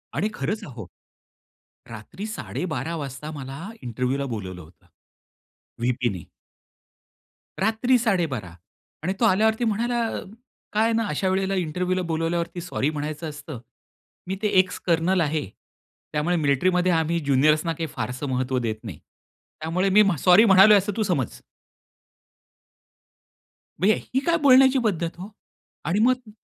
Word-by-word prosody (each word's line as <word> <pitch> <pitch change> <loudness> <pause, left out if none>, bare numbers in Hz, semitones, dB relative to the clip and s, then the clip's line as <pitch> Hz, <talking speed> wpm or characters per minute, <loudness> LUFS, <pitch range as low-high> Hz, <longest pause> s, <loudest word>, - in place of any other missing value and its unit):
आणि 200 +10 0
खरंच 205 +8 -3
अहो, 120 -7 -9 1.0
रात्री 115 - -8
12:30 165 -5 -4
वाजता 145 +2 -6
मला 135 +3 -7 0.2
इंटरव्ह्यूला 125 +3 -2
बोलावलं 95 -4 -6
होतं! 80 +2 -19 0.9
व्हीपीने. 120 - -2 1.3
रात्री 225 +5 +2
12:30! 160 - -1 0.5
आणि 185 - 0
तो 235 - +3
आल्यावरती 220 +3 +3
म्हणाला, 235 +2 0 0.7
"काय 215 - +3
आहे 230 0 +2
ना, 225 -1 +1
अशा 185 +3 -1
वेळेला 190 +1 0
इंटरव्ह्यूला 180 +2 -1
बोलावल्यावरती 170 +2 -2
सॉरी 160 -5 -1
म्हणायचं 155 +1 -4
असतं. 145 -3 -8 0.7
मी 190 - -2
ते 210 - +1
एक्स 185 -1 +1
कर्नल 175 +2 +2
आहे, 155 -1 0 0.7
त्यामुळे 155 +4 +1
मिलिट्रीमध्ये 180 +5 +2
आम्ही 165 0 +1
ज्युनियर्सना 150 +3 +2
काही 160 +1 -4
फारसं 125 +3 -4
महत्त्व 130 0 -1
देत 115 -2 -2
नाही. 95 -10 -8
त्यामुळे 170 +5 -5
मी 205 +3 +6
म्ह 200 -3 +2
सॉरी 185 - +6
म्हणालोय 200 +1 +8
असं 200 +1 -1
तू 215 - +1
समज!" 155 - -2 2.4
म्हणजे 205 +4 +4 0.2
ही 260 - +3
काय 335 0 +3
बोलण्याची 265 -1 +6
पद्धत 175 -6 -1
हो! 195 +4 -7 0.6
आणि 185 +5 +1
मग 250 -1 +2
170 Hz, 130 wpm, -24 LUFS, 140-200 Hz, 2.4 s, म्हणालोय